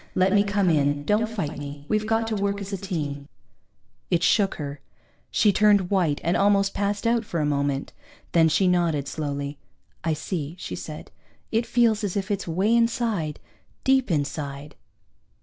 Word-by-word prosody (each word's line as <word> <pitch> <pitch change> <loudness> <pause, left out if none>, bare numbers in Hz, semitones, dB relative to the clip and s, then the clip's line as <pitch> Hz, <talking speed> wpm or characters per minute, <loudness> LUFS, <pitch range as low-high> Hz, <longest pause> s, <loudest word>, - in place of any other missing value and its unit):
Let 185 +1 +3
me 205 0 +5
come 200 -3 +1
in, 145 -1 +1
don't 215 +4 +2
fight 160 -10 -4
me. 145 0 -8
We've 215 0 0
got 225 0 +1
to 220 - -1
work 200 0 -1
as 200 0 -6
a - - -1
team._ 150 -7 -4 0.8
It 175 -1 +1
shook 200 0 +3
her. 145 -2 -6 0.5
She 205 -2 +3
turned 205 -3 +4
white 175 -7 +2
and 170 +2 +1
almost 200 0 +3
passed 205 +2 -1
out 230 0 +2
for 175 -5 -3
a 150 - +1
moment. 140 -1 -1 0.4
Then 165 -1 +5
she 185 +4 +3
nodded, 170 -6 +1
slowly. 140 -1 -4 0.4
"I 165 -1 +1
see," 155 0 -4
she - - -6
said. - - -8 0.4
"It 230 +1 +1
feels 230 -3 +3
as 200 -1 -1
if 200 +1 -2
it's 200 -2 -2
way 190 +7 +2
inside, 230 -9 0 0.4
deep 265 -2 +3
inside." 145 -2 -3
185 Hz, 170 wpm, -25 LUFS, 150-205 Hz, 0.8 s, me